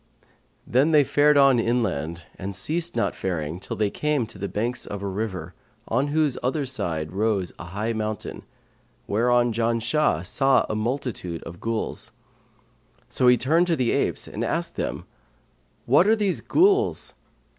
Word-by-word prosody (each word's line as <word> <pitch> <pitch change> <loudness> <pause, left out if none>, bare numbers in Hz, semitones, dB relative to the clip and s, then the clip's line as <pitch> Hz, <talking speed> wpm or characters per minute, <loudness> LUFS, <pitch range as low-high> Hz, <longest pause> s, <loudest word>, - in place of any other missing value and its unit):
Then 135 +6 +3
they 150 -2 +6
fared 145 +2 +4
on 135 -3 +6
inland 85 - -1
and 95 +1 -6
ceased 165 - -1
not - - +1
faring 85 -3 -3
till 95 - -6
they 105 -2 0
came 150 -5 0
to 105 -3 -10
the 100 - -2
banks 120 +5 -3
of 100 -1 -5
a - - -2
river, 95 -4 -4 0.3
on 140 - +1
whose 150 -2 +1
other 135 +3 0
side 80 -12 -3
rose 100 -2 0
a - - -7
high 105 +6 -3
mountain, 110 -1 -4 0.6
whereon 120 +2 +2
Janshah 115 - +1
saw 135 +7 +3
a - - -3
multitude 110 -6 -3
of 85 +1 -9
Ghuls. 115 -1 -2 1.0
So 125 - +2
he 125 0 +7
turned 165 +8 +2
to 170 - +2
the 125 -5 +1
apes - - -1
and - - -4
asked - - -2
them, - - -3 0.8
'What 145 +10 +5
are 220 - +5
these 205 -4 -1
Ghuls?' 395 +5 +2
115 Hz, 155 wpm, -24 LUFS, 100-145 Hz, 1.0 s, he